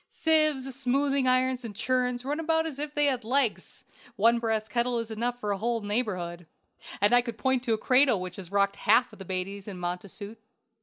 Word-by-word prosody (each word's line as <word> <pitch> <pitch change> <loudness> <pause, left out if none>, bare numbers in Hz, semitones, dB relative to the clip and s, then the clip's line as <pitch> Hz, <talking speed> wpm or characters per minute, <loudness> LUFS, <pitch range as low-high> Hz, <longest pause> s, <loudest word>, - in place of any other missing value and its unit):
"Sieves, 310 -5 +1
smoothing 275 +1 +1
irons, 255 0 +2
and 220 -3 -7
churns 250 +1 -1
run 290 +3 -2
about 325 0 +1
as 295 -4 -6
if 295 0 -5
they 295 0 +3
had 260 -4 0
legs; 250 0 -1 0.3
one 230 +3 +4
brass 220 -2 -1
kettle 235 +2 0
is 230 -1 -4
enough 240 +3 -2
for 210 -3 -2
a 200 - -2
whole 230 +1 -1
neighborhood, 185 -6 -3 0.5
and 205 +3 +3
I 245 - +6
could 235 -2 -7
point 260 +3 +1
to 230 - +2
a - - +1
cradle 255 -1 +4
which 180 -1 -6
has 185 -2 -7
rocked 200 0 +1
half 250 - +3
the 195 - -10
babies 190 +2 -4
in 195 -3 -6
Montacute. 190 +4 -6
235 Hz, 200 wpm, -27 LUFS, 205-260 Hz, 0.5 s, I